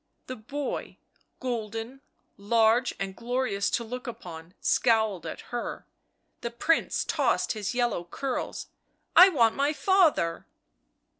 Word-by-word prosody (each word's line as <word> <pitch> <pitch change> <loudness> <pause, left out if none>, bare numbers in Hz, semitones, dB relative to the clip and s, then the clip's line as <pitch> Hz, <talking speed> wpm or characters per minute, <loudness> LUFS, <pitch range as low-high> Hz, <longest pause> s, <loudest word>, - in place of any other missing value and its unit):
The 255 - -6
boy, 275 +6 -5 0.4
golden, 230 +1 -4 0.3
large 225 +4 +2
and 195 -1 -4
glorious 240 -4 -1
to 235 - -1
look 250 +3 -7
upon, 170 -6 -9
scowled 220 -7 +2
at - - -6
her. 240 - -4 0.6
The 235 - -3
Prince 285 +7 +1
tossed - - +1
his 215 +1 -3
yellow 240 -8 0
curls. 260 +9 -4 0.2
" - - -45
I 370 - +10
want 235 -10 +3
my 285 +2 +1
father." 315 - +2
235 Hz, 125 wpm, -27 LUFS, 205-255 Hz, 0.6 s, I